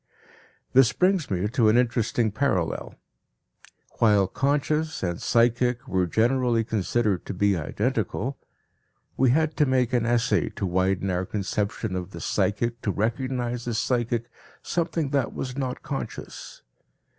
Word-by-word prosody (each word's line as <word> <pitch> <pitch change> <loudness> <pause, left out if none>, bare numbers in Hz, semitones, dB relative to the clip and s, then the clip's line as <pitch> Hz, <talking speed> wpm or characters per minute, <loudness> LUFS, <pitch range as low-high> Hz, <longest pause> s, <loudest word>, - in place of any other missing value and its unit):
This 125 -1 +5
brings 180 -4 +2
me 95 +1 0
to 115 -3 +3
an 110 - +4
interesting 115 -2 +1
parallel. 100 -9 -1 1.0
While 105 -4 +5
"conscious" 150 +4 0
and 85 -2 -2
"psychic" 120 +1 +2
were 95 -1 +1
generally 120 +3 +2
considered 105 -2 0
to - - -4
be 100 +1 +2
identical, 75 -5 -2 0.8
we 130 -1 +3
had 155 +4 +2
to 150 - +3
make 130 -2 +1
an 120 -1 +2
essay 120 0 +2
to - - -2
widen 95 +1 0
our 90 +1 -1
conception 100 -1 -2
of 90 -1 -5
the - - -7
"psychic" 115 +3 -1
to - - -2
recognize 120 +3 -2
as 115 -2 -1
psychic 120 -1 -1 0.3
something 165 -4 -1
that 140 -4 0
was 125 -1 -4
not 130 -2 -3
conscious. 140 - -7
120 Hz, 135 wpm, -25 LUFS, 100-130 Hz, 1.0 s, This